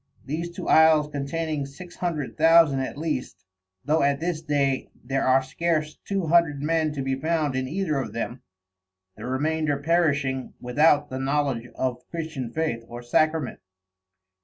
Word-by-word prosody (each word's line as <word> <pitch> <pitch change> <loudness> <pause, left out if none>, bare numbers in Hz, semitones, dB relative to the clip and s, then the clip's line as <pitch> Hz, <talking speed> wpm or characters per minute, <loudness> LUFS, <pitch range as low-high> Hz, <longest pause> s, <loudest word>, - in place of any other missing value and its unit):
These 160 +5 -3
two - - -6
Isles 155 -2 +5
containing 145 0 -2
six 175 +6 -12
hundred 160 -6 -3
thousand 165 -3 +5
at 130 +1 -4
least, 155 - -4 0.4
though 155 +3 +2
at 140 0 +2
this 165 -1 -2
day 140 -4 0 0.2
there 135 +1 0
are 130 +1 +4
scarce 155 +2 -1
two 195 -3 -1
hundred 165 -3 +3
men 160 0 +1
to 140 -2 -3
be 135 0 -1
found 155 0 0
in 130 0 -1
either 160 -2 -1
of 125 -5 -4
them, 115 +3 -4 0.7
the - - -7
remainder 150 +3 0
perishing 140 -4 0
without 145 +3 +3
the 130 - -3
knowledge 135 -3 0
of 125 -1 -2
Christian 155 -8 -5
Faith 135 -6 -2
or 120 +1 -8
Sacrament. 155 +3 +1
150 Hz, 155 wpm, -25 LUFS, 135-160 Hz, 0.7 s, Isles